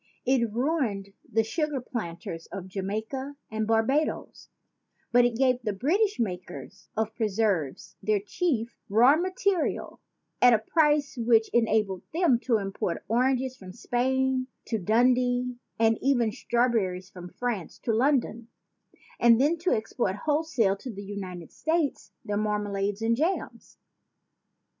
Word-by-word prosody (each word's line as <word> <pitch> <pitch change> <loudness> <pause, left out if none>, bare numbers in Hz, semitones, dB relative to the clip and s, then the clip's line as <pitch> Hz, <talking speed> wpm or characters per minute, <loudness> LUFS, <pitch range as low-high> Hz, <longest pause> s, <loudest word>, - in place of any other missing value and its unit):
It 245 -4 +2
ruined 230 -6 -1 0.2
the 225 +1 +3
sugar 295 +5 -2
planters 170 -8 -6
of 190 -2 -7
Jamaica 220 +9 -4 0.2
and 220 0 -2
Barbadoes; 225 +7 0 0.6
but 245 0 +5
it 245 -1 +1
gave 255 -1 +2
the 215 -3 -2
British 360 - +1
makers 180 - -5
of 220 0 -1
preserves 205 - -1
their 215 -1 +1
chief 235 - -2
raw 240 +8 +6
material 370 0 -1 0.4
at 245 -1 +7
a - - +3
price 295 +4 +1
which 230 -1 +3
enabled 215 -5 +2
them 325 -9 +3
to 235 -4 +3
import 195 -4 -3
oranges 255 +3 +1
from 185 -6 -11
Spain 260 +2 0 0.2
to 225 - -2
Dundee 245 +4 +2 0.2
and 225 0 +3
even 245 -5 +2
strawberries 210 -7 0
from 180 -1 -9
France 230 -4 -4
to 230 - 0
London, 240 -2 +1 0.7
and 235 -1 +6
then 295 +5 +3
to 360 +3 0
export 215 -2 -1
wholesale 295 -10 +2
to 255 - -8
the 200 -1 -8
United 185 -4 -7
States 315 -3 -1
their 205 0 -1
marmalades 205 -1 -1
and 230 +1 +2
jams." 330 +9 -3
230 Hz, 130 wpm, -27 LUFS, 205-265 Hz, 0.7 s, at